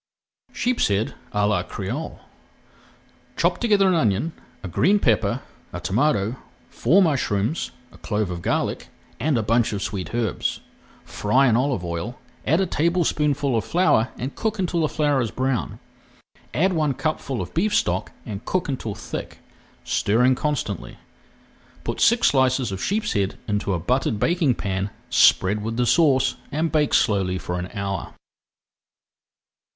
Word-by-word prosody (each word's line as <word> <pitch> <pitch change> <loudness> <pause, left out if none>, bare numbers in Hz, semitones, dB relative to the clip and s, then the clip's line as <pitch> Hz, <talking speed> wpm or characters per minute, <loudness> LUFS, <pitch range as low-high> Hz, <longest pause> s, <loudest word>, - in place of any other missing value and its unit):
SHEEPSHEAD 110 - 0 0.2
À 105 0 +1
LA 105 -4 +2
CRÉOLE 100 - -5 1.2
Chop - - +1
together 205 -5 +3
an 185 - +3
onion, 125 - +1 0.3
a - - -4
green 190 - +3
pepper, 115 - +1 0.3
a - - -5
tomato, 110 0 +1 0.3
four 195 +4 +4
mushrooms, 130 - 0 0.2
a - - -17
clove 105 -3 -2
of 85 -1 -5
garlic - - -1 0.3
and 145 +1 +1
a 115 - 0
bunch 115 +2 +2
of 100 - -2
sweet 95 -4 -4
herbs. 120 -2 -1 0.5
Fry 125 +7 +2
in 115 - +3
olive 125 -7 0
oil, 85 +9 -4 0.3
add 160 +5 +3
a 195 - +2
tablespoonful 150 -5 +1
of 110 - +1
flour 165 -9 +2
and 130 +3 -4
cook 220 -1 -2
until 180 -3 -1
the 155 - +1
flour 145 -3 +1
is 115 - -1
brown. 130 0 -2 0.7
Add 185 +4 +2
one 155 -5 +1
cupful 140 -5 -2
of - - -5
beef 210 +5 +1
stock - - 0
and 105 -1 -6
cook 185 +6 -1
until 120 -7 -3
thick, 110 - -6 0.5
stirring 125 +5 +2
constantly. 130 - -3 0.9
Put - - -3
six 235 +1 +5
slices 130 -3 +2
of 95 -1 -4
sheepshead 105 - 0
into 105 -1 -1
a - - -2
buttered 120 +2 0
baking 165 - +2
pan, 95 0 -2 0.2
spread 100 +3 +4
with 115 +1 -3
the 125 - +2
sauce, 135 -3 +3
and 160 +3 0
bake 150 -2 +2
slowly 95 -3 +2
for 90 0 -4
an 90 +1 -5
hour. 100 -3 -4
125 Hz, 145 wpm, -23 LUFS, 105-155 Hz, 1.2 s, six